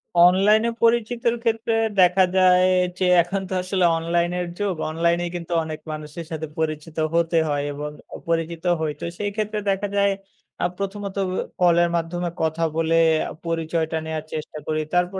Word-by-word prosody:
অনলাইনে 195 +6 +5
পরিচিতির 235 0 +2
ক্ষেত্রে 225 0 0 0.3
দেখা 180 +1 +5
যায় 185 0 +5 0.3
যে 185 - +2 0.2
এখন 190 +3 -3
তো - - -4
আসলে 185 -1 +1
অনলাইনের 175 +2 0
যুগ। 200 -3 0
অনলাইনে 170 +2 +1
কিন্তু 170 0 -5
অনেক 155 -1 -6
মানুষের 155 +2 -7
সাথে 160 -1 -4
পরিচিত 155 0 -3 0.2
হতে 170 0 +2
হয় 145 -1 0
এবং 150 +1 -5 0.4
পরিচিত 165 0 -1 0.2
হই। 160 -1 -1
তো - - -3
সেই 205 0 -2
ক্ষেত্রে 215 0 -2
দেখা 195 +1 0
যায় 200 0 +4 0.5
আ - - +3
প্রথমত 200 0 -4
অ - - -3 0.3
কলের 175 -1 +4
মাধ্যমে 170 +1 -2
কথা 160 +1 0
বলে 165 0 +1 0.3
আ - - -8 0.2
পরিচয়টা 165 -1 -1
নেয়ার 160 -1 -3
চেষ্টা 155 0 -5
করি। 155 0 0
তারপর 180 +2 +1
175 Hz, 160 wpm, -23 LUFS, 160-195 Hz, 0.5 s, অনলাইনে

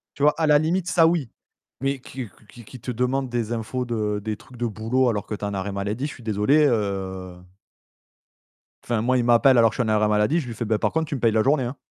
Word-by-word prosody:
tu 145 - -5
vois, 150 0 +5
à 160 - +3
la 150 -1 +6
limite, 170 +4 0
ça, 165 -3 +5
oui. 165 -8 0 0.5
Mais 135 +1 -1
qu'il 125 -3 -8
q 110 - -24
qu'il 120 -2 -14
qu'il 125 +3 -12
te 125 - -5
demande 125 +3 -1
des 120 -1 -2
infos 120 +3 -3
de 105 -3 -2
des 110 -1 -2
trucs 125 - -16
de 120 - -3
boulot 115 +4 0
alors 105 -3 -2
que 105 - -4
tu - - -8
es - - -4
en 100 -1 -3
arrêt 95 +1 -3
maladie, 105 +7 -3
je 150 - -6
suis 125 - -14
désolé, 115 +8 +3
heu 95 -5 -2 1.5
enfin 120 -2 -1
moi, 130 +2 +2
il 120 - +1
m'appelle 120 +2 +5
alors 115 -1 +5
que - - -10
suis 125 - +1
en 110 - -2
arrêt 105 0 +2
maladie, 105 +11 +2
je 135 - -7
lui 115 - -6
fais: 115 - -4
«Bah, 110 -1 0
par - - 0
contre, 160 0 0
tu 150 - -4
me 135 - -4
payes 115 -2 +3
la 110 0 +3
journée, 135 +1 +2
hein». 125 +4 -5
120 Hz, 270 wpm, -23 LUFS, 105-135 Hz, 1.5 s, la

